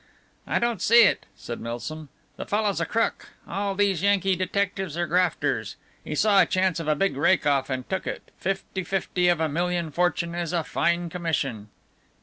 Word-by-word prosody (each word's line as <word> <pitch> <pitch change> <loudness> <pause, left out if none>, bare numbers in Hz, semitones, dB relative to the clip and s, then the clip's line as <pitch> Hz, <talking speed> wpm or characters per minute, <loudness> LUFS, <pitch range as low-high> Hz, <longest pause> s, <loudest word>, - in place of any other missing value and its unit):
"I - - +1
don't 235 -5 0
see 235 +2 +7
it," 200 - +2
said 120 - -7
Milsom, 140 +6 -6 0.3
"the - - -7
fellow's 205 -4 0
a 165 - -1
crook, 230 -1 -1 0.2
all 200 0 -2
these 195 -4 +1
Yankee 195 -1 +2
detectives 185 -2 -2
are 175 - +1
grafters. 180 -1 0 0.3
He 150 - -4
saw 200 +3 +5
a 170 - +3
chance 185 -2 +1
of 165 - -5
a 155 - +3
big 195 +2 0
rake 165 +6 +3
off 140 -2 +2
and 130 -1 -3
took 190 -1 -3
it, - - -6
fifty 190 0 -3
fifty 180 0 0
of 175 -2 +3
a 160 - +1
million 170 +1 -1
fortune 170 0 0
is 175 0 -2
fine 170 0 0
commission!" 140 - -2
175 Hz, 180 wpm, -25 LUFS, 160-195 Hz, 0.3 s, see